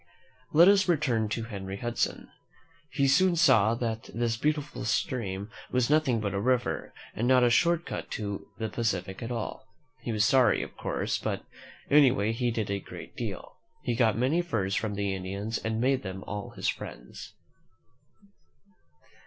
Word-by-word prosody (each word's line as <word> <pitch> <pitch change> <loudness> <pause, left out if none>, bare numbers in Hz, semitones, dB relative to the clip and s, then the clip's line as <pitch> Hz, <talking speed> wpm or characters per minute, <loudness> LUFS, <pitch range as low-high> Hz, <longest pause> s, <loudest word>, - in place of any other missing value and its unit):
Let 165 +4 +7
us 195 -1 +5
return 130 -10 +1
to 115 +2 -2
Henry 100 -3 -6
Hudson. 120 +2 -2 0.6
He 140 - +1
soon 175 +7 +4
saw 115 -10 +5
that 115 -2 -3
this 115 -1 0
beautiful 150 +4 -2
stream 105 -2 -2 0.2
was 125 +1 +1
nothing 150 -7 +3
but 100 -2 -2
a 100 - -1
river, 125 +2 0 0.2
and 115 +4 -1
not 130 -1 +5
a 120 - +4
short 170 +5 +3
cut - - -5
to 100 -2 -4
the 110 - -2
Pacific 95 -4 -2
at 115 - -4
all. 115 -2 -5 0.3
He 120 - -3
was 110 -1 +2
sorry, 130 +2 +4
of - - -10
course; - - -2
but - - -3 0.5
anyway, 130 -7 +5
he 120 +2 0
did 110 -4 -2
a 100 - -1
great - - -10
deal. - - -6 0.3
He 120 - 0
got 115 -3 +2
many 135 +8 +2
furs 105 - -2
from 110 -1 -1
the 100 -1 -1
Indians 100 +4 -3
and 110 0 -2
made 130 +2 +2
them 95 -1 -6
all 105 -1 -5
his - - -4
friends. - - -6
115 Hz, 165 wpm, -28 LUFS, 100-130 Hz, 0.6 s, Let